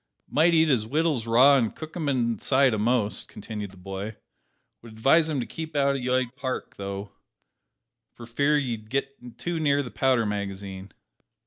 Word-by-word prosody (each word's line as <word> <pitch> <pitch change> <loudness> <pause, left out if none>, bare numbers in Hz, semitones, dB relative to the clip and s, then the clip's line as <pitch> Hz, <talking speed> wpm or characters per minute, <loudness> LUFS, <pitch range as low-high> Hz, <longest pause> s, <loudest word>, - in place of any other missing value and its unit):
"Might 165 +3 +3
eat 160 0 +5
his 120 -7 +1
wittles 150 -4 0
raw 130 +5 +6
an' 115 -4 +1
cook 155 +6 -10
'em 160 -5 -1
inside 130 +1 +2
a'most!" 110 -2 +1
continued 105 -1 -7
the 95 - -16
boy; 95 +3 -6 0.7
"would 115 -1 -12
advise 140 +9 +3
him 150 -3 -1
to 120 - -2
keep 160 +3 -7
out 140 -1 +2
of 135 - -3
'yde 125 0 0
Park, 130 -2 -4
though, 100 0 -5 1.0
for 120 - -12
fear 140 +6 +2
he'd 115 -6 -3
git 135 -2 -4
too 175 -1 -3
near 145 -2 +2
the 125 - -8
powder 130 -4 +2
magazine!" 100 -1 -5
125 Hz, 165 wpm, -26 LUFS, 110-140 Hz, 1.0 s, raw